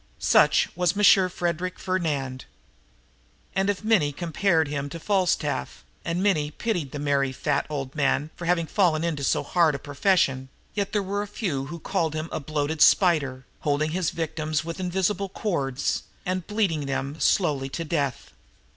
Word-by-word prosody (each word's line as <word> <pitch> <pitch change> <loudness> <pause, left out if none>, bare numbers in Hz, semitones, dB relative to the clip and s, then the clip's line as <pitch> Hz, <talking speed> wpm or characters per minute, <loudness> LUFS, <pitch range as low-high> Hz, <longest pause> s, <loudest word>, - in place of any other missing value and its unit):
Such - - +4
was 180 0 +1
Monsieur 195 -2 +5
Frederic 180 0 -2
Fernand. 145 -8 -2 1.1
And, 195 +1 +1
if 205 +1 -1
many 215 -10 +3
compared 165 +1 +1
him 145 -1 -3
to 165 - -7
Falstaff, 185 - -1 0.2
and 170 +2 -1
many 155 -8 +2
pitied 170 -3 -2
the - - -5
merry, 140 -2 +1
fat 130 - -1
old 135 -3 -4
man 150 +1 0
for 170 - -7
having 170 -1 +2
fallen 165 -3 +2
into 160 -4 -2
so - - +1
hard 165 -4 +2
a - - -2
profession, 140 -3 +1 0.2
yet 200 -1 -2
there 210 -2 0
were 200 +2 -2
a 205 - -4
few 155 - -3
who 170 +3 -7
called 165 -2 -1
him 155 +1 -3
a - - -2
bloated 150 +1 -2
spider, 140 -8 +4
holding 150 +1 0
his 175 -1 0
victims, 155 -1 -2
with 165 +2 -5
invisible 190 +2 -1
cords, 145 - -1 0.2
and 185 -1 -2
bleeding 190 -9 0
them 135 +3 -3
slowly 145 -8 +2
to 165 +4 -4
death. 145 -5 -2
160 Hz, 165 wpm, -25 LUFS, 145-185 Hz, 1.1 s, Monsieur